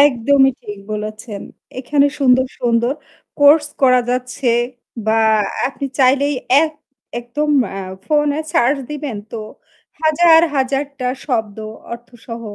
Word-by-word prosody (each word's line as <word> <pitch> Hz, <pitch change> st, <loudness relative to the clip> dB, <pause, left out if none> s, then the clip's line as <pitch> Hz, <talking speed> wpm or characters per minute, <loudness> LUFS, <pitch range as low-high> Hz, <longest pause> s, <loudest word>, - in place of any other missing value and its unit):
একদমই 270 Hz, 0 st, +4 dB
ঠিক 205 Hz, -1 st, -8 dB
বলেছেন। 215 Hz, 0 st, -6 dB, 0.4 s
এখানে 280 Hz, +2 st, +2 dB
সুন্দর 260 Hz, -1 st, +4 dB
সুন্দর 235 Hz, +1 st, +1 dB, 0.5 s
কোর্স 295 Hz, +1 st, +6 dB, 0.2 s
করা 255 Hz, -1 st, +5 dB
যাচ্ছে 250 Hz, +1 st, -1 dB, 0.6 s
বা 225 Hz, +1 st, +3 dB, 0.5 s
আপনি 275 Hz, 0 st, -5 dB
চাইলেই 275 Hz, +2 st, +3 dB, 0.3 s
এক 315 Hz, -1 st, -1 dB, 0.5 s
একদম 295 Hz, +6 st, -2 dB, 0.3 s
আ -, -, -4 dB, 0.3 s
ফোনে 295 Hz, -1 st, +1 dB
সার্চ 265 Hz, +5 st, +3 dB
দিবেন 295 Hz, -6 st, -5 dB, 0.2 s
তো 225 Hz, -, -4 dB, 0.6 s
হাজার 320 Hz, +1 st, +5 dB, 0.2 s
হাজারটা 270 Hz, 0 st, -2 dB, 0.2 s
শব্দ 220 Hz, -5 st, -2 dB, 0.3 s
অর্থসহ 235 Hz, 0 st, -9 dB
260 Hz, 110 wpm, -18 LUFS, 235-285 Hz, 0.6 s, কোর্স